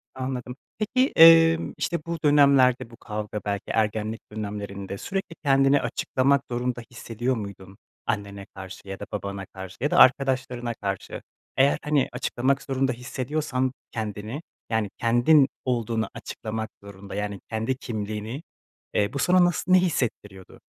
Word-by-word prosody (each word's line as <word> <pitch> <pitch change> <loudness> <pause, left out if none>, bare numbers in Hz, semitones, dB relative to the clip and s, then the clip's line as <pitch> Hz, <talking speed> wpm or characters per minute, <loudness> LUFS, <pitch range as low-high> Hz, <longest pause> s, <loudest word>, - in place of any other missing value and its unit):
Anladım. 130 -1 -4 0.2
Peki, 255 +5 +1
emm, 165 0 +7
işte 170 -2 -1
bu 170 0 -3
dönemlerde, 140 -5 +5
bu 115 - -14
kavga, 105 -1 -5
belki 100 -1 -2
ergenlik 110 0 -1
dönemlerinde 100 -2 -5
sürekli 195 - -4
kendini 135 0 +4
açıklamak 135 +1 +1
zorunda 120 0 -2
hissediyor 120 +2 -2
muydun? 100 -2 -8 0.3
Annene 100 -3 -3
karşı 95 0 -9
ya 95 0 -6
da - - -6
babana 100 -1 -4
karşı 95 0 -10
ya 145 - 0
da - - +2
arkadaşlarına 130 -3 +3
karşı? 100 -3 -5 0.4
Eğer, 135 +2 +4
hani, 150 -2 +2
açıklamak 130 +2 0
zorunda 135 -1 0
hissediyorsan 130 +1 -2 0.2
kendini, 110 +4 -4 0.3
yani, 110 -3 0
kendin 120 +5 +5 0.2
olduğunu 115 -3 -1
açıklamak 110 0 -5
zorunda, 100 0 -10
yani, 105 -1 -3
kendi 110 +3 -1
kimliğini, 110 +2 -5 0.5
eee, 105 +4 +1
bu 140 - -2
sana 180 +2 +5
nası 180 +1 +1
ne 185 - +8
hissettiriyordu? 105 - -3
120 Hz, 135 wpm, -25 LUFS, 105-135 Hz, 0.5 s, ne